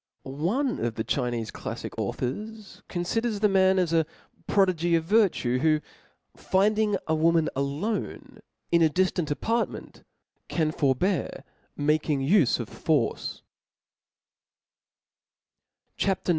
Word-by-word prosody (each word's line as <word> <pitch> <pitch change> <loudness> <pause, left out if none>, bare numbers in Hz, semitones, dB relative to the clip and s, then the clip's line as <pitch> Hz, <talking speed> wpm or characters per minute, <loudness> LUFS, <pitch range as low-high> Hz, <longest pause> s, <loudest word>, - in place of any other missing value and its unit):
One 195 - -1
of 115 -1 -1
the 110 - -2
Chinefe 120 -4 -2
claffic - - -6
authors 210 - -5
conHders 215 +5 -1
the 210 - +4
m^n 190 -1 +4
as 175 -3 +1
a 160 -2 +3 0.4
prodigy 175 -4 +2
gf 165 -1 +3
virtue, 170 - +2
who 155 +1 +3 0.6
finding 210 +2 +2
a 160 - 0
woman 165 0 +3
alone 140 +11 -3 0.3
in 170 -1 +4
a 160 - +5
diftant 180 -1 0
apartment, 225 - -2 0.5
can 155 -2 0
fi)rbear 155 +6 0 0.3
making 150 -1 +1
ijfe 150 - +3
of 120 - -4
force 150 -8 -1 0.8
*/ - - -59
CHAP. 195 -1 0
IX. - - -1
170 Hz, 115 wpm, -26 LUFS, 145-200 Hz, 0.8 s, a